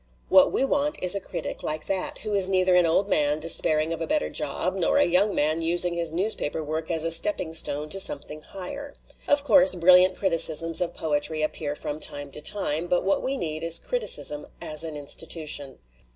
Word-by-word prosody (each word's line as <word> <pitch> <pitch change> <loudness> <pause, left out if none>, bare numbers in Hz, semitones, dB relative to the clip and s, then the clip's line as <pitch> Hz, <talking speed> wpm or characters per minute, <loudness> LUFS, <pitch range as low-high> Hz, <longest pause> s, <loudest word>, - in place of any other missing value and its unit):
What - - +5
we 270 - 0
want 290 +2 -1
is 180 - +4
a 200 - -1
critic - - -7
like 155 0 -4
that, 190 -1 -4
who 210 - -4
is 195 -2 +2
neither 185 -1 +1
an 180 -1 +4
old 190 +5 +1
man 150 -4 +2
de 160 - -4
spairing 155 0 +2
of 165 - -7
a 165 - -3
better 75 - -2
job - - -2
nor 80 0 0
a - - +4
young 190 +4 +1
man 155 +3 +1
using 175 +1 0
his 170 -2 -2
newspaper 165 -3 -1
work 155 +1 -5
as 165 -2 -1
a 165 - 0
stepping 165 -1 +3
stone 150 -2 0
to 195 - -1
some 170 - +3
thing 150 +2 -12
higher. 280 - -9 0.3
Of 285 0 +2
course, 280 -4 +4
brilliant 180 +1 +4
criticisms 165 -3 +2
of 175 - -3
poetry 155 0 -2
appear 150 -1 -4
from 150 0 -6
time 145 -2 -2
to 150 - -8
time, 165 -1 -1
but 175 0 0
what 195 +1 0
we 270 +1 -3
need 155 -7 -4
is 165 0 +5
criticism 485 - 0
as 155 +1 -4
an 160 -2 -6
institution. 145 -1 -2
165 Hz, 210 wpm, -24 LUFS, 155-190 Hz, 0.3 s, What